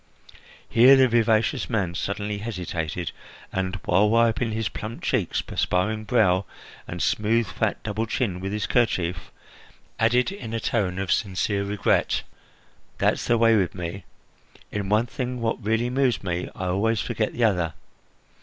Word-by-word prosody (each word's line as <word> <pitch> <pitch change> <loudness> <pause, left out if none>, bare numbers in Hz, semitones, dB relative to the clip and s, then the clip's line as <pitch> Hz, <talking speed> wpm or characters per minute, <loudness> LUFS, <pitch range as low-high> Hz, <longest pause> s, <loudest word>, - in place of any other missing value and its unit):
Here 125 +4 +7
the 130 -1 +5
vivacious 115 +2 +2
man 100 -8 0
suddenly 100 +3 -3
hesitated 90 -6 -4 0.4
and, 95 +1 -1
while 95 +4 +4
wiping 115 +1 +2
his 110 -1 -1
plump 110 +3 -7
cheeks, 110 -10 0
perspiring 105 +4 -1
brow, 100 -6 +3 0.4
and 90 0 -3
smooth, 115 +2 +2
fat 110 -1 -2
double 110 +1 -2
chin 105 -6 -1
with 95 +1 -4
his 105 0 -2
kerchief, 95 -8 0 0.7
added 120 +8 +3
in 115 - -6
a - - -1
tone 95 -6 -1
of 95 -1 -2
sincere 100 -1 0
regret: 100 0 +1 0.7
"That's - - +1
the 120 - +3
way 115 0 +5
with 95 -5 +1
me! 90 +2 -5 0.7
In 100 -2 -3
one 105 +3 +3
thing 125 0 -4
which 115 -1 0
really 115 +3 0
moves 130 -4 +1
me, 90 -1 -2
I 95 - -4
always 100 +5 +1
forget 110 +6 -2
the 120 - -1
other. 90 -7 +1
110 Hz, 150 wpm, -25 LUFS, 95-115 Hz, 0.7 s, Here